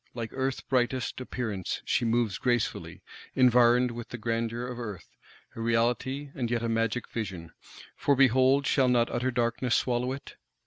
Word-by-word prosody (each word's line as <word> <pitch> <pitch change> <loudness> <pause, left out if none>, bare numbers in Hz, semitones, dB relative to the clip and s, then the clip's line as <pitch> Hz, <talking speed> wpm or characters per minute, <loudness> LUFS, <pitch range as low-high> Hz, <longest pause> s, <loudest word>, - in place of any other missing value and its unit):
Like 115 -2 -4
Earth's 135 0 -2
brightest 130 0 -1
Appearance, 110 -7 -4
she - - +1
moves 115 -3 +1
gracefully, 120 -3 -1 0.3
environed 125 -1 +5
with 120 0 -7
the 125 - -6
grandeur 115 +1 -2
of 125 -1 -6
Earth: 105 -6 -8 0.4
a 115 - -6
reality, 120 +5 0
and 120 -3 -3
yet 120 -1 -1
a - - 0
magic 115 +1 0
vision; 95 -7 -5 0.4
for, 140 - +2
behold, 130 +1 +4
shall 135 -3 +3
not 120 -1 +2
utter 130 +2 0
Darkness 120 0 0
swallow 125 0 0
it! 135 +1 -8
120 Hz, 155 wpm, -28 LUFS, 115-130 Hz, 0.4 s, environed